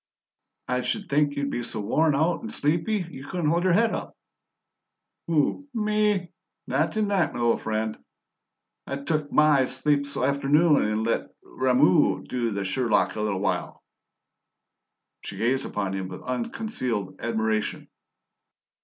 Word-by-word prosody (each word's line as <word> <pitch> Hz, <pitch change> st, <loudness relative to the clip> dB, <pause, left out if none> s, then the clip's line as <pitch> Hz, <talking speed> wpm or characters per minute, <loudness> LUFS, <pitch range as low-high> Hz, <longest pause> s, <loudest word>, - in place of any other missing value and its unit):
"I 125 Hz, 0 st, 0 dB
should 205 Hz, +9 st, -3 dB
think 145 Hz, 0 st, +2 dB
you'd 140 Hz, 0 st, -2 dB
be 120 Hz, -, -2 dB
so 120 Hz, -, -3 dB
worn 150 Hz, +9 st, +2 dB
out 165 Hz, +4 st, +1 dB
and 225 Hz, -, -6 dB
sleepy 170 Hz, +7 st, 0 dB
you 145 Hz, -4 st, -10 dB
couldn't 170 Hz, -4 st, 0 dB
hold 170 Hz, +1 st, +1 dB
your 185 Hz, -, +4 dB
head 225 Hz, +5 st, +3 dB
up!" -, -, -5 dB, 1.1 s
"Who? 170 Hz, -, 0 dB
ME? 210 Hz, -4 st, +1 dB, 0.3 s
Not 150 Hz, +5 st, 0 dB
t' 215 Hz, -, 0 dB
night, 195 Hz, -7 st, +1 dB
m'little 120 Hz, -1 st, +1 dB
friend. 110 Hz, 0 st, -3 dB, 0.8 s
I -, -, -3 dB
tuk 150 Hz, +1 st, -2 dB
MY 150 Hz, -3 st, +5 dB
sleep's 145 Hz, +1 st, 0 dB
aft'noon 140 Hz, +3 st, +3 dB
and 110 Hz, +1 st, 0 dB
let 115 Hz, -, -1 dB
Rameau 130 Hz, +5 st, +3 dB
do 120 Hz, -2 st, -2 dB
the 100 Hz, -2 st, -3 dB
Sherlock 115 Hz, +4 st, +1 dB
a 105 Hz, -, -3 dB
little 100 Hz, -3 st, -1 dB
while." -, -, -2 dB, 1.4 s
She -, -, -7 dB
gazed 130 Hz, +3 st, +1 dB
upon 100 Hz, -2 st, -3 dB
him 95 Hz, -1 st, -3 dB
with 90 Hz, 0 st, -9 dB
unconcealed 125 Hz, -, -3 dB
admiration. 110 Hz, -2 st, -1 dB
140 Hz, 140 wpm, -26 LUFS, 115-165 Hz, 1.4 s, MY